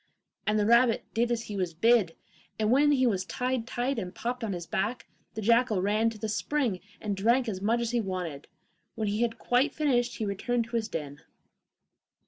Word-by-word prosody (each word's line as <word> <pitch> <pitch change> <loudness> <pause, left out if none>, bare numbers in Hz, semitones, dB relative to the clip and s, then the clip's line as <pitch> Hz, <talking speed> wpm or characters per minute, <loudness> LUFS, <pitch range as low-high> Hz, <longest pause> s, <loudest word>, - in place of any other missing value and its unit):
The 210 -1 +2
rabbit 235 +1 +4
did 235 +1 +1
as 235 -1 0
he 210 - -7
was 180 -4 -2
bid, 215 -2 +3 0.4
and 215 0 +1
when 290 +3 +5
he 260 -2 +3
was 195 -6 +1
tied 250 +3 -2
tight 250 +1 -1
and 180 -3 -6
popped 245 +1 -3
on 210 -3 -2
his 175 -1 -5
back, 210 +8 -2 0.3
the 220 - -4
jackal 230 -1 +3
ran 210 +4 +2
to 225 - -9
the 220 - -3
spring 235 -2 -1 0.2
and 205 -2 -2
drank 235 +6 +2
as 190 -4 -3
much 230 +4 +1
as 235 -1 -1
he 240 -1 +1
wanted. 180 -7 -5 0.5
When 220 -2 -2
he 210 +2 -1
had 235 -1 0
quite 245 +4 +1
finished 250 -6 +1
he 220 - -2
returned 230 +4 -1
to 235 +1 -7
his 225 -2 0
den. 145 -6 -6
225 Hz, 200 wpm, -28 LUFS, 200-240 Hz, 0.5 s, when